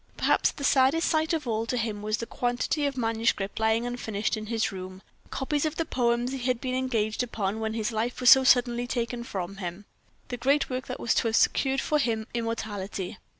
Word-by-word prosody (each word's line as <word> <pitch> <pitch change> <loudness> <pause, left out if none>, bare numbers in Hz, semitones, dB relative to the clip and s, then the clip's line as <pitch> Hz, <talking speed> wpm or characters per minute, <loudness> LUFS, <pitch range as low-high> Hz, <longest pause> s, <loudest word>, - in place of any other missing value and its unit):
Perhaps - - +2
the 285 - -8
saddest 275 +5 +3
sight 315 0 +1
of 315 -5 -1
all 225 0 -1
to 250 - -1
him 220 -3 -2
was 215 +1 -1
the 230 - -4
quantity 245 +5 -1
of 275 -1 -4
manuscript 225 -4 0
lying 220 +1 +2
unfinished 220 -4 -2
in 215 0 -6
his 220 -1 0
room 185 0 -8 0.3
copies 290 +2 -1
of 310 0 -1
the 330 - -1
poems 240 -1 0
he 270 - -4
had 250 -1 0
been 255 0 -3
engaged 235 -5 0
upon 220 -4 -2
when 220 0 -2
his 225 +1 -1
life 230 +3 -2
was 250 -1 +7
so 265 - +8
suddenly 245 -1 +3
taken 235 0 -2
from 195 -5 -5
him 180 +1 -6 0.4
the 245 - -4
great 275 +3 +1
work 255 +2 -3
that 255 - -5
was 235 - +1
to - - +1
have 225 - 0
secured 270 +3 +2
for 300 - +1
him 225 -5 0
immortality. 210 -5 -4
235 Hz, 210 wpm, -27 LUFS, 220-260 Hz, 0.4 s, so